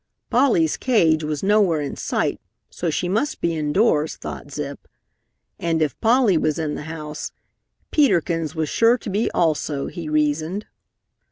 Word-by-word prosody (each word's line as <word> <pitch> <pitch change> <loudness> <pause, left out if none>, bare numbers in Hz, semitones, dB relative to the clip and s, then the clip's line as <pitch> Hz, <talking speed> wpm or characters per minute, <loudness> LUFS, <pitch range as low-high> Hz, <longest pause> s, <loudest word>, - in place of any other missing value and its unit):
Polly's 235 - +3
cage 165 -11 +3
was 150 -1 -3
nowhere 195 -5 +3
in 145 -1 -4
sight, - - -1 0.3
so 175 - -2
she 170 +3 -1
must 220 +11 -1
be 170 -1 0
indoors, 155 +1 +1
thought - - -8
Zip. 145 0 -6 0.7
And 165 -1 0
if 155 -3 -1
Polly 225 -6 +4
was 155 -1 0
in 155 -2 -2
the - - -6
house, 155 -1 -6 0.6
Peter 285 - +4
Kins 165 -2 -3
was 160 -1 -1
sure 230 - +4
to 220 - -7
be 215 +4 +1
also, 155 -3 0
he 170 -4 -6
reasoned. 155 +6 0
165 Hz, 155 wpm, -22 LUFS, 150-205 Hz, 0.7 s, Polly